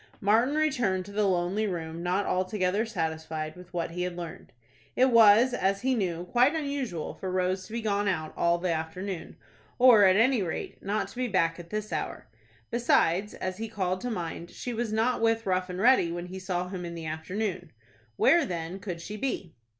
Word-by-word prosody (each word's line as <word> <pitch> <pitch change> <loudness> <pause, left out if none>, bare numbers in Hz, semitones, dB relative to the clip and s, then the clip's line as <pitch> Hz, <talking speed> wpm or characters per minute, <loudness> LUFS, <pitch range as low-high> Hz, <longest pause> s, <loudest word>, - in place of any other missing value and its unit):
Martin 230 +8 +3
returned 245 -12 +1
to 200 - -10
the 205 0 +1
lonely 185 +4 0
room, 165 -3 -4
not 180 +3 0
altogether 185 +3 0
satisfied 160 -5 -3
with 180 -1 -13
what 170 -1 -3
he 180 +1 -4
had 180 -1 -2
learned. 170 -2 -8 0.4
It 260 +1 +4
was, 230 +2 +7
as 195 -3 0
he 265 0 +2
knew, 180 -7 -1
quite 250 - +3
unusual 280 - -3
for 190 - -6
Rose 185 0 -1
to - - -15
be 230 -1 -3
gone 205 -1 0
out 160 -5 -1
all 170 0 +2
the 175 -1 -1
afternoon, 165 +3 -5 0.4
or, 240 -5 +7
at 185 -1 +5
any 235 +2 +4
rate, 170 -4 -4
not 205 +2 -2
to - - -14
be 255 0 0
back 165 -5 +1
at 170 -1 -10
this 215 0 -4
hour. - - -4 0.5
Besides, 210 -5 +2
as 185 0 -4
he 225 - -3
called 185 -3 -2
to 245 - -3
mind, 170 -4 -4
she 245 - -6
was 230 -1 -2
not 225 +3 +1
with 225 0 +2
Rough 185 -1 0
and 180 - -5
Ready 230 -6 +4
when 175 +1 -4
he 185 +1 -7
saw 180 -1 -2
him 185 -2 -5
in 170 -1 -6
the 165 -1 -6
afternoon. 175 +3 -4 0.4
Where, 335 - +5
then, 175 -4 -4
could 180 -4 -6
she 210 +5 -6
be? 215 -9 -3
190 Hz, 200 wpm, -28 LUFS, 175-225 Hz, 0.5 s, was